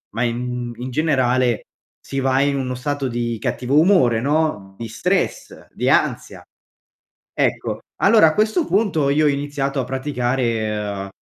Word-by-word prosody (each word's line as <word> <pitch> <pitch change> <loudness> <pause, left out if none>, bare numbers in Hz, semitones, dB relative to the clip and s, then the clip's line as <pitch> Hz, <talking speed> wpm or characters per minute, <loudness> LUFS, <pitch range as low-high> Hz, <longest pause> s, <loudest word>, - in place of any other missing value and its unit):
ma 120 - 0
in 120 0 -3
in 125 +2 -5
generale, 130 -5 +1 0.4
si 135 - -4
va 135 0 +2
in 140 0 +1
uno 130 -1 -2
stato 145 +1 -2
di 120 -1 -2
cattivo 130 +4 +1
umore, 155 - +4
no, 140 -10 -1
di 115 - -5
stress, 180 - -2
di - - -3
ansia, - - 0 0.9
ecco. - - -1 0.2
Allora, 215 -8 +6
a 155 - -1
questo 220 +10 +1
punto 190 -9 +1
io 150 +2 +2
ho - - +5
iniziato 140 -1 -2
a - - -2
praticare, 115 -7 -2
130 Hz, 145 wpm, -20 LUFS, 120-145 Hz, 0.9 s, Allora